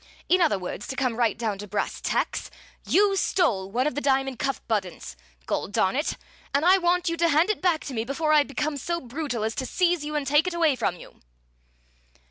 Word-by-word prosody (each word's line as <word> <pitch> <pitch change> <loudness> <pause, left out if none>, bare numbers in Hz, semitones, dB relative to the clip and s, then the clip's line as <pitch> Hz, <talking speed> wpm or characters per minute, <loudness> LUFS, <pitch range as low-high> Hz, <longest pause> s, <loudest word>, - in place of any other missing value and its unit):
In 365 0 +3
other 310 - +3
words, 185 +2 -6
to 265 - -5
come 255 -4 0
right 230 -3 +1
down 220 -4 -2
to 205 - -7
brass 205 +1 -3
tacks, - - -1 0.4
you 400 +1 +4
stole 230 - +1
one 245 +6 0
of 300 - 0
the 290 - -3
diamond 270 -2 +1
cuff 275 -1 -1
buttons, 185 - -3 0.3
gol - - -2
darn 190 0 +1
it! 295 +4 -1 0.4
and 285 +3 +2
I 375 +2 +6
want 350 0 +1
you 335 - +1
to 335 0 +3
hand 325 +7 +3
it 430 - -5
back 350 -4 +1
to 275 - -6
me 225 -2 -1
before 305 +5 0
I 300 - +7
become 290 +1 -2
so 340 +5 -2
brutal 255 -3 -4
as 220 +1 -1
to 260 - -3
seize 355 -3 +1
you 300 +1 -4
and 295 -2 -1
take 295 +5 +3
it 360 - -2
away 325 -5 +3
from 220 -7 -1
you!" - - -14
280 Hz, 225 wpm, -25 LUFS, 230-335 Hz, 0.4 s, I